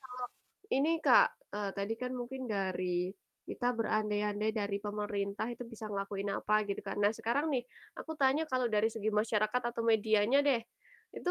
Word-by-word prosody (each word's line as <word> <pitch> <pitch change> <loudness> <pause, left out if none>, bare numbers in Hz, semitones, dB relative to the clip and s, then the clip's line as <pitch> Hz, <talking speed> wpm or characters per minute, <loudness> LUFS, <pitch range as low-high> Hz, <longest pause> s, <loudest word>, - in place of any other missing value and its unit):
kalo 255 -1 -8 0.5
ini 275 +3 +3 0.2
Kak, - - +8 0.3
eee, 205 -1 -2
tadi 200 +2 -1
kan 250 0 -2
mungkin 260 +2 -5
dari 190 -2 -1 0.6
kita 245 - -2
berandai-andai 210 -1 0
dari 200 -1 -1
pemerintah 205 0 -2
itu 240 - -7
bisa 225 -1 -8
ngelakuin 195 0 -3
apa 210 - 0
gitu 200 - -2
kan. - - -3
Nah 205 +1 +5
sekarang 240 +6 +1
nih 255 -3 +1 0.4
aku 320 - -5
tanya 270 +3 +4
kalau 255 -1 +2
dari 210 +1 +4
segi 220 -1 -1
masyarakat 215 +2 +1
atau 235 -1 -3
medianya 220 +3 +4
deh, 265 -5 +4 0.6
itu 360 - -1
215 Hz, 165 wpm, -33 LUFS, 205-250 Hz, 0.6 s, Kak